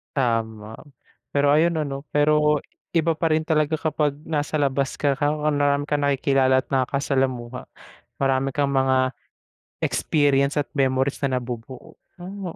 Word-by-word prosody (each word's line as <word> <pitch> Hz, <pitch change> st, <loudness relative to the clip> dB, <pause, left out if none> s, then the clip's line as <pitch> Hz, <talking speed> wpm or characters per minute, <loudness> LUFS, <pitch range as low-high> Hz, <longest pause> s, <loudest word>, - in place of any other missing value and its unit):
Tama. 110 Hz, -4 st, -1 dB, 0.6 s
Pero 145 Hz, 0 st, +3 dB
ayun 165 Hz, +3 st, +3 dB
ano, 140 Hz, -1 st, -5 dB
pero 150 Hz, 0 st, +3 dB, 0.3 s
iba 165 Hz, 0 st, +3 dB
pa 165 Hz, 0 st, -1 dB
rin 155 Hz, 0 st, +2 dB
talaga 155 Hz, -1 st, +1 dB
kapag 150 Hz, -2 st, -1 dB
nasa 155 Hz, -1 st, -1 dB
labas 140 Hz, -1 st, 0 dB
ka 145 Hz, -1 st, +1 dB
raw, 145 Hz, 0 st, +2 dB, 0.2 s
marami 145 Hz, 0 st, +1 dB
kang 145 Hz, -1 st, -1 dB
nakikilala 135 Hz, -2 st, +2 dB
at -, -, -37 dB
nakaka-salamuha. 130 Hz, -2 st, -1 dB, 0.5 s
Marami 135 Hz, 0 st, +1 dB
kang 140 Hz, -1 st, +1 dB
mga 130 Hz, -1 st, +2 dB, 0.7 s
experience 145 Hz, -1 st, +1 dB
at 145 Hz, -, 0 dB
memories 135 Hz, -1 st, 0 dB
na 130 Hz, -2 st, +1 dB
nabubuo, 120 Hz, +1 st, -8 dB, 0.2 s
oh 185 Hz, -1 st, -7 dB
140 Hz, 135 wpm, -23 LUFS, 130-150 Hz, 0.7 s, Pero